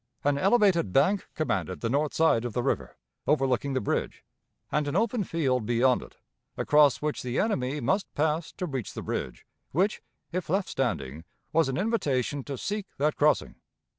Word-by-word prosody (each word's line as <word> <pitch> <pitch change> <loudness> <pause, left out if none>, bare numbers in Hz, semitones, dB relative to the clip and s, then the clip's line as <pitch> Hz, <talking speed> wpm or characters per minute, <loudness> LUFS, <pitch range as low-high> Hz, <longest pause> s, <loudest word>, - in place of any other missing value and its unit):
An 145 0 +2
elevated 190 - +3
bank 185 - +2
commanded 95 - -2
the 115 - 0
north 145 +5 0
side 160 -8 +3
of 120 -3 -4
the 125 - -1
river, 70 - -2 0.3
overlooking 135 -1 +1
the 130 - +1
bridge, 100 - -2 0.5
and 150 -1 +1
an 145 - -2
open 225 +2 +1
field 130 - 0
beyond 120 +1 +3
it, - - -13 0.4
across 150 -2 +4
which 150 -1 -1
the 125 0 -3
enemy 145 - 0
must 190 - 0
pass 155 +2 0
to 180 - -4
reach 135 - -4
the - - -5
bridge, - - -4 0.3
which, 190 +8 +1 0.3
if 180 -2 -3
left 190 +3 0
standing, 80 - -2 0.3
was 160 -3 +3
an 130 - -2
invitation 145 - 0
to 140 -2 -5
seek 205 - -3
that 150 +2 +1
crossing. 150 -1 +2
145 Hz, 170 wpm, -28 LUFS, 125-170 Hz, 0.5 s, across